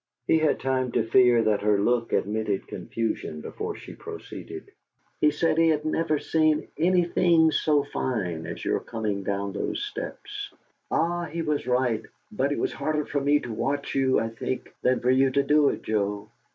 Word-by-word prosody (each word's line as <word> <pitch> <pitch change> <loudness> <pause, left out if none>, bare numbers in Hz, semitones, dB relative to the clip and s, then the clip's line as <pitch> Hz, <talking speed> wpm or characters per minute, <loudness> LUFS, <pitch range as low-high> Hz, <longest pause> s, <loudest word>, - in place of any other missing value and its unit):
He 160 - +4
had 155 -1 +2
time 130 -1 0
to - - +2
fear 120 -1 +5
that 105 -2 +2
her 105 0 +3
look 120 +2 +1
admitted 105 -1 -1
confusion 110 -8 -3
before - - -5
she - - -10
proceeded: - - -9 0.5
"He 150 - +5
said 155 +2 +1
he 165 - +5
had 155 -1 +1
never 155 0 +1
seen 155 0 +1
anything 170 -1 +3
so 150 -1 +2
fine 95 - -3
as - - -6
your - - +1
coming 110 -4 -3
down 100 0 -2
those 105 - -2
steps. 415 -1 -6 0.4
Ah, 175 +1 0
he 165 +1 -4
was 150 -2 -1
right! 125 -3 +1 0.3
But - - 0
it - - -1
was - - -1
harder 150 -1 -1
for 145 - -2
me 145 +1 +3
to 120 - -6
watch 140 +5 -2
you, 130 -1 +3
I 115 - -1
think, 115 +3 -5
than 125 0 +2
for 125 - +3
you 135 +1 +4
to 140 +1 +2
do 145 +1 +4
it, - - -4
Joe. 105 -1 -2
135 Hz, 180 wpm, -26 LUFS, 110-155 Hz, 0.5 s, fear